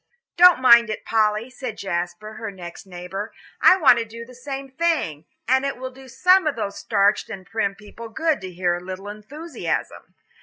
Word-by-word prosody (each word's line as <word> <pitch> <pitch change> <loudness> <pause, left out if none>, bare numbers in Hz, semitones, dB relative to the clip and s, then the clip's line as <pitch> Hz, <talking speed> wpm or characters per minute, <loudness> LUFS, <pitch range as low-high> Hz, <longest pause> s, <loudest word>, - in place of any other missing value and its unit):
"Don't 355 -2 +7
mind 235 -3 +6
it, 215 - -5
Polly," 215 +2 +1
said 255 -4 -6
Jasper, 175 +3 -4
her 220 0 -6
next 180 -1 -10
neighbour, 185 +3 -6 0.3
"I 370 - +7
want 275 -9 +5
to - - -1
do 230 +1 -10
the 250 - -15
same 270 +2 -7
thing. 265 - -1 0.2
And 260 +2 +3
it 275 -2 -2
will 260 +1 -6
do 265 +1 -15
some 365 +7 +3
of 300 - 0
those 200 -3 -4
starched 205 -1 +1
and 195 -4 -8
prim 200 -2 -2
people 215 +3 -11
good 315 +2 0
to 185 - -6
hear 175 0 0
a 175 - -10
little 190 +2 -7
enthusiasm." 275 +11 -6
225 Hz, 190 wpm, -22 LUFS, 195-265 Hz, 0.3 s, Don't